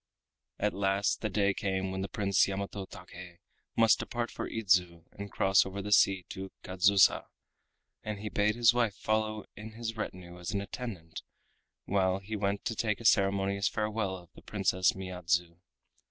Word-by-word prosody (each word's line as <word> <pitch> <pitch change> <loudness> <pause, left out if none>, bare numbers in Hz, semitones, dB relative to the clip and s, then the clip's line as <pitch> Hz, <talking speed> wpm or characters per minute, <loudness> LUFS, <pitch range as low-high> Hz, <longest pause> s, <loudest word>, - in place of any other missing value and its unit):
At 105 +1 0
last 100 +1 0
the 110 - -1
day 100 -1 +2
came 95 -1 -2
when 95 0 -3
the 95 - -2
Prince 100 -3 +2
Yamato 100 0 -4
Take 90 -1 -11 0.4
must 115 -2 +5
depart 120 -2 -3
for - - -5
Idzu 90 -6 +1
and 100 0 -8
cross 95 +1 +4
over 95 +1 -6
the 105 +1 -5
sea 95 -2 +4
to 95 0 -7
Kadzusa, 95 +1 +4 0.7
and 105 -1 -4
he 105 +2 -6
bade 105 +1 +1
his 120 0 +5
wife 120 -4 +1
follow 110 0 -1
in 110 0 -9
his 115 0 -5
retinue 90 -4 -6
as 85 - -5
an 100 - 0
attendant 100 -6 -7 0.6
while 95 -1 +1
he 100 +3 -6
went 100 -1 -1
to 115 - -1
take 110 -2 -1
a 115 - -10
ceremonious 100 -1 +3
farewell 105 -3 -2
of 90 -2 -15
the - - -15
Princess 95 -2 +1
Miyadzu. 90 -2 -2
100 Hz, 170 wpm, -30 LUFS, 95-105 Hz, 0.7 s, must